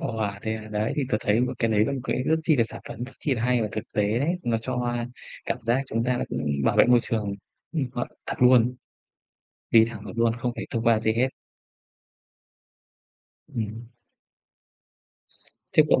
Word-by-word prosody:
Wow, 110 -3 -2
thế 110 0 -1
à, 110 0 -9
đấy, 105 +1 -1
thì 145 - +1
tớ - - +3
thấy 105 +2 +2
một 125 - 0
cái 115 - +1
đấy 105 -1 +4
là 110 - -1
một 135 - -3
cái 130 - 0
rất 160 +5 +2
chi 155 -1 +3
là 115 - +4
sản - - -8
phẩm 120 - -5
rất 135 - -10
chi 140 - 0
là 115 - -3
hay 125 -1 +2
và 105 - -1
thực 110 - -3
tế 105 +2 +1
đấy, 140 +5 0
nó 115 -1 +1
cho, 125 +3 -4
a, 120 -1 -1 0.4
cảm - - -1
giác 120 +3 +2
chúng 115 0 -1
ta 125 0 +1
đã - - -1
cũng - - -3 0.2
bảo - - +2
vệ - - +8
môi 125 0 +6
trường. 105 -3 -2 0.4
Ừm, 155 -5 0
ờ, 120 - -2 0.2
thật - - -2
luôn, 125 -1 +5 1.0
đi 115 -1 +7
thẳng 110 -3 -8
được 100 - -6
luôn, 115 -1 +3
không 120 +1 -1
phải - - -4
thông 115 -1 -2
qua 115 -2 +4
gì 110 0 +1
hết. 125 +4 +2 2.2
Ừm 110 0 -4 1.9
Theo - - +8
cậu - - +5
115 Hz, 210 wpm, -26 LUFS, 110-125 Hz, 2.2 s, vệ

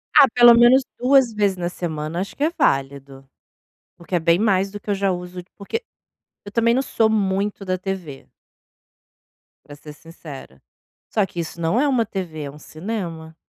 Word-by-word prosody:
Ah, 275 - +9
pelo 240 -1 +8
menos 240 +3 +6
2 255 -2 +3
vezes 205 -3 0
na 175 -1 -2
semana 160 -2 -4
acho 195 - -6
que 285 - -3
é 315 - +2
válido. 135 0 -1 0.7
Porque 175 +2 -8
é - - +4
bem 170 +1 +3
mais 195 -2 +1
do 205 +1 -8
que 205 - -7
eu - - +2
já 195 0 0
uso 180 0 -7
de 175 - -31
porque 445 - -5 0.6
eu 205 - -10
também 230 +1 +2
não 265 - +1
sou 225 -4 +1
muito 200 -1 -1
da 185 -1 -1
TV. 185 -8 -6 1.4
Para 145 - -12
ser 150 +1 -12
sincera. 150 - -12 0.5
Só 210 -3 +1
que 175 - -8
isso 170 0 -5
não 165 +8 +1
é 290 - +2
uma 255 -5 +1
TV, 180 -7 -5
é 140 - -6
um 150 - -14
cinema. 165 -2 -6
185 Hz, 185 wpm, -21 LUFS, 160-220 Hz, 1.4 s, Ah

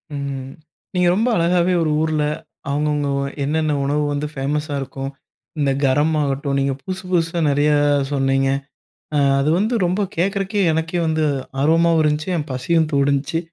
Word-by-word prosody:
ம். 135 -2 -5 0.4
நீங்க 180 -1 +3
ரொம்ப 225 +5 +1
அழகாவே 175 +1 +2
ஒரு 155 -2 +1
ஊர்ல, 155 -1 +1 0.5
அவுங்க 150 +2 0
அவுங்க 145 -1 -1 0.3
என்னென்ன 155 +1 0
உணவு 145 +2 0
வந்து 145 +1 -2
ஃபேமஸா 145 +2 -2
இருக்கும். 135 +1 -5 0.5
இந்த 140 -1 +2
கரம் 145 +4 +2
ஆகட்டும். 140 0 -1
நீங்க 135 0 +1
புதுசு 190 +5 -5
புதுசா 170 -1 +1
நெறைய 145 +2 +2 0.4
சொன்னீங்க. 135 -1 +1 0.7
அ - - +3 0.2
அது 140 +2 +1
வந்து 220 +4 0
ரொம்ப 185 +4 0 0.2
கேட்கறக்கே 195 +3 0
எனக்கே 165 +2 -1
வந்து 160 -1 +1 0.4
ஆர்வமாவும் 165 +2 +3
இருந்துச்சு. 150 +3 0
என் 150 -2 -4
பசியும் 155 +5 +1
தூண்டுணுச்சு 140 +3 +1
150 Hz, 145 wpm, -20 LUFS, 140-165 Hz, 0.7 s, நீங்க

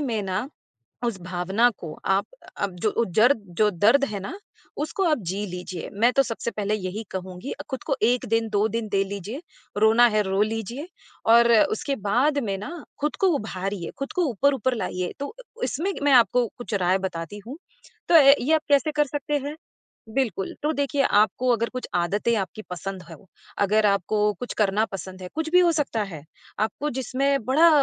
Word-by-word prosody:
में 230 -7 -1
ना 190 +7 -2 0.6
उस 200 -6 -3
भावना 185 +6 +1
को 160 -3 -7
आप 195 +1 +2 0.3
अब 195 -3 -2
जो 225 +2 +1
ज़र्द 225 -1 +4
जो 215 -1 +5
दर्द 225 +10 +4
है 200 - -3
ना 250 - -6 0.5
उसको 385 +4 -2
आप 305 -4 +2
जी 200 +2 -2
लीजिए। 180 -1 -6
मैं 230 +5 +3
तो 275 - +4
सबसे 235 -1 -4
पहले 210 -1 -1
यही 195 +1 -4
कहूँगी 185 +5 -6
अ, - - -7
खुद 265 -2 -4
को 275 -3 0
1 245 +3 +3
दिन, 225 0 +1
2 210 0 +2
दिन 225 0 -3
दे 195 -1 +1
लीजिए। 200 - -6 0.4
रोना 220 +3 +6
है, 215 -1 +2
रो 195 +1 +1
लीजिए 225 - -3 0.4
और 235 +1 +6 0.2
उसके 275 +5 -2
बाद 280 +7 +3
में 195 -2 -1
ना 305 - -7 0.2
खुद 300 +1 -1
को 385 - +4
उभारिए, 195 -4 -4
खुद 275 +8 -4
को 365 -3 +1
ऊपर-ऊपर 260 +1 +1
लाइए 180 -3 -3
तो 285 +10 -5 0.3
इसमें 365 +7 -1
मैं 285 -1 +3
आपको 245 0 +5
कुछ 240 -3 -5
राय 185 0 +2
बताती 185 0 -5
हूँ। 275 +6 -7 0.5
तो 335 - +7
ये 280 0 +6
आप 315 - +3
कैसे 285 +2 +3
कर 295 0 +3
सकते 290 +1 -3
हैं? 285 +2 -6 0.6
बिल्कुल, 220 -8 -1
तो 305 - +2
देखिए 285 0 0
आपको 215 +3 +2
अगर 230 0 0
कुछ 255 - -4
आदतें 205 +7 +1
आपकी 195 +2 -4
पसंद 185 +1 -5
हों, 165 -2 -12 0.4
अगर 210 +2 +3
आपको 200 +1 +1 0.2
कुछ 245 - -5
करना 210 0 +2
पसंद 190 -1 -7
है, 180 - -6
कुछ 320 0 -2
भी 360 - +6
हो 345 -1 +5
सकता 275 -8 0
है। 165 -8 -8 0.4
आपको 220 +7 -1
जिसमें 270 0 0
बड़ा 310 +6 +5
225 Hz, 190 wpm, -24 LUFS, 195-275 Hz, 0.6 s, तो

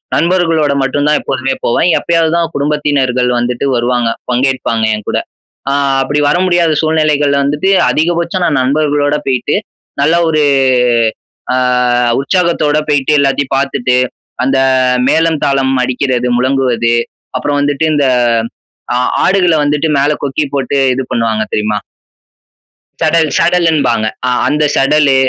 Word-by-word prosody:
நண்பர்களோட 165 -4 +1
மட்டும் 135 +2 -1
தான் 150 - +3
எப்போதுமே 135 0 -2
போவேன். 120 - +1
எப்பயாவது 165 -2 0
தான் 165 -1 -1
குடும்பத்தினர்கள் 140 -4 0
வந்துட்டு 120 +2 -2
வருவாங்க. 120 0 0 0.2
பங்கேற்பாங்க 125 -3 0
என்கூட. 105 -1 -4 0.5
அ - - 0 0.3
அப்படி 145 +2 -1
வர 150 - +2
முடியாத 175 -3 +2
சூழ்நிலைகள்ல 150 -3 +1
வந்துட்டு 145 +6 -1 0.2
அதிகபட்சம் 170 +5 0
நான் 145 -5 +1
நண்பர்களோட 145 +2 0
போயிட்டு, 130 -2 0 0.5
நல்ல 160 +4 +2
ஒரு 155 -1 +1 1.1
அ - - +1 0.6
உற்சாகத்தோட 155 -1 0
போயிட்டு, 145 -1 +1
எல்லாத்தையும் 135 -1 0
பார்த்துட்டு, 130 -2 0 0.5
அந்த 135 0 +1 0.5
மேளம் 160 -2 +1
தாளம் 135 -1 +1
அடிக்கிறது, 125 -1 -1
முழங்குவது, 125 -3 +1 0.4
அப்புறம் 145 +3 -1
வந்துட்டு 145 +2 0
இந்த 145 -2 +1 0.9
ஆ - - 0 0.3
ஆடுகள 185 -3 +2
வந்துட்டு 145 +2 0
மேல 140 +2 +2
கொக்கி 140 +2 -1
போட்டு 140 +1 -1 0.2
இது 130 +1 -3
பண்ணுவாங்க 110 -2 0
தெரியுமா? 105 0 -1 1.2
சடல், 160 0 +2
சடல் 175 0 +2
என்பாங்க. 120 -7 0 0.2
ஆ. - - +1 0.2
அந்த 150 +1 0
சடலு, 140 0 +3
145 Hz, 125 wpm, -13 LUFS, 130-155 Hz, 1.2 s, தான்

